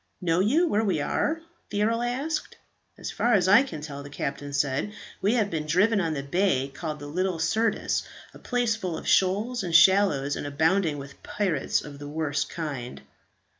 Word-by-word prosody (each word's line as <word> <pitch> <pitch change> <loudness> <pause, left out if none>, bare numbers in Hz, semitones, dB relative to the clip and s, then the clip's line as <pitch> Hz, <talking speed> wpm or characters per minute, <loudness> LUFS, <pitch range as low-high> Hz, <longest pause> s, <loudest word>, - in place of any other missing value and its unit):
"Know 170 -1 +1
you 285 - +3
where 220 -7 +1
we 190 -7 +1
are?" 310 - -1 0.3
the 205 0 0
earl 230 +2 +1
asked. 270 +6 -2 0.4
"As - - -5
far 240 - +1
as 185 -2 +3
I 200 +5 +7
can 210 - -5
tell," 145 -2 -7
the 140 - -9
captain 145 0 -4
said, 140 +7 -1 0.3
"we 205 +5 +2
have 215 -4 +1
been 155 -2 -3
driven 200 +6 +3
up 165 -3 -1
the 140 - -3
bay 140 -3 +1
called 155 -1 -5
the 145 - -9
Little 180 +4 -1
Syrtis 215 +7 0 0.3
a - - -13
place 245 -3 0
full 185 -6 -4
of - - -8
shoals 210 +6 +2
and 170 -3 -2
shallows, 165 -5 +5
and - - -4
abounding 160 +2 +1
with 140 0 -10
pirates 180 -9 -1
of 145 -1 -10
the 145 - -7
worst 150 -1 -2
kind." 140 -7 -5
175 Hz, 190 wpm, -26 LUFS, 145-210 Hz, 0.4 s, I